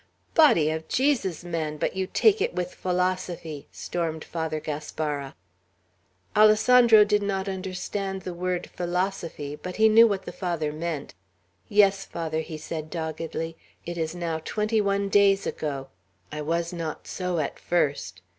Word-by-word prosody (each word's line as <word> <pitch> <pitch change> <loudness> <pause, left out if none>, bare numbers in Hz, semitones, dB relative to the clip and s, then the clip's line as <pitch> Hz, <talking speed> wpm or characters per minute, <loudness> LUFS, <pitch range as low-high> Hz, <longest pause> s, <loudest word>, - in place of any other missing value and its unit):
"Body 170 - +5
of 160 0 -4
Jesus! 245 - +1
man! 160 -3 -3
But - - -1
you 190 0 -1
take 430 - +3
it 450 - 0
with 180 0 -2
philosophy!" 180 -4 -2
stormed 160 -2 -3
Father 160 -2 -3
Gaspara. 150 -2 -4 1.0
Alessandro 220 +1 +7
did 210 0 +2
not 195 -1 -2
understand 190 0 -4
the 180 - -5
word 180 0 -2
"philosophy," 175 -5 -2
but 180 +4 -7
he 220 0 +5
knew 225 +2 +8
what 200 -3 -2
the - - -5
Father 165 -5 -2
meant. 155 -2 -4 0.6
"Yes, 200 -1 +4
Father," 160 -2 -3
he 160 0 -5
said 155 0 -6
doggedly. 165 0 -4 0.3
"It 175 - -4
is 160 0 -2
now 170 -2 -2
twenty 215 +3 0
one 200 0 +1
days 195 -1 +4
ago. 140 -3 -4 0.4
I 150 0 -4
was 170 +3 -1
not 165 -2 -5
so 180 -2 -3
at 150 -3 -2
first. 115 - -1
175 Hz, 145 wpm, -26 LUFS, 160-195 Hz, 1.0 s, knew